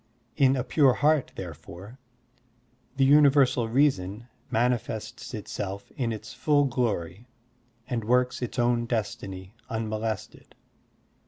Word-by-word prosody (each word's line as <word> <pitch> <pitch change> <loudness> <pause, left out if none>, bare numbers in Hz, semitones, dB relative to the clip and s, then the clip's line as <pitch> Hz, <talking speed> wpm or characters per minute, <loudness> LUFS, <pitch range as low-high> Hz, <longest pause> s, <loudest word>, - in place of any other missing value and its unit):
In 135 -2 +4
a 125 - -1
pure 135 -2 +4
heart, 150 +1 +2
therefore, 90 - -9 1.0
the 135 - +4
universal 140 -4 +5
reason 115 -5 +1 0.2
manifests 115 -2 -2
itself 100 0 -6
in 120 -3 -1
its 110 0 -7
full 145 -2 +2
glory 115 -5 -2 0.6
and 120 -4 -2
works 125 +3 +1
its 125 - -4
own 120 -1 +1
destiny 100 -4 -4 0.2
unmolested. 110 -1 -4
120 Hz, 105 wpm, -27 LUFS, 105-130 Hz, 1.0 s, universal